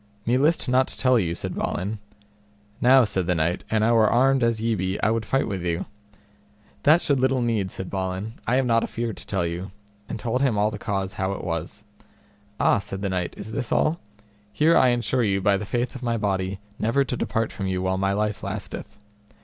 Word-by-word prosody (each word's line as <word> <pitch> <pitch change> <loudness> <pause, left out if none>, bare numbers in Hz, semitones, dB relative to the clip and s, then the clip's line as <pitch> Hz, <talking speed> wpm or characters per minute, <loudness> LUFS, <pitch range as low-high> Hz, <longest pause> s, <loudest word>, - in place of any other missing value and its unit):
Me 120 - +2
list 150 +5 +2
not 130 +1 +3
to - - -9
tell 130 -2 +4
you, 85 -4 -1
said - - -4
Balin. 100 +4 -3 0.8
Now, 130 +1 +7
said 95 -5 -1
the 90 - +2
knight, 85 +2 0
an 110 -1 +2
I 115 - +3
were 110 -2 +5
armed 135 +2 +3
as 115 -1 +2
ye 115 +1 0
be 95 -1 -2
I 110 - +4
would 115 -1 -1
fight 135 - +1
with 95 -3 -3
you. 85 0 -1 1.0
That 155 +4 +5
should 140 -2 +2
little 130 -1 +2
need, 110 -5 0
said 95 0 -7
Balin, 95 +3 -3
I 125 - +2
am 130 0 +2
not 115 -1 +3
afeard 115 -2 -3
to - - -11
tell 95 -4 0
you, 85 +3 -4 0.4
and - - -4
told 120 +4 -1
him 130 -6 +2
all 105 +1 +2
the 105 - -6
cause 95 -1 -2
how 95 -1 -1
it - - -6
was. 85 +4 -4 0.8
Ah, - - +4
said 95 0 -5
the 100 - 0
knight, 90 -2 -2
is 110 - -7
this 120 -1 -4
all? 160 +3 +2 0.5
here 160 +7 +3
I 130 - +6
ensure 120 +1 +1
you 100 -3 +1
by 100 +1 +3
the 100 +2 -3
faith 120 +3 -2
of 130 - -8
my 120 -2 0
body 95 -2 -1 0.2
never 120 +6 +2
to 125 - -3
depart 115 -1 -1
from 95 - -4
you 95 -1 -1
while 95 0 0
my 95 0 +1
life 105 0 -1
lasteth. - - -6
110 Hz, 220 wpm, -24 LUFS, 95-125 Hz, 1.0 s, Now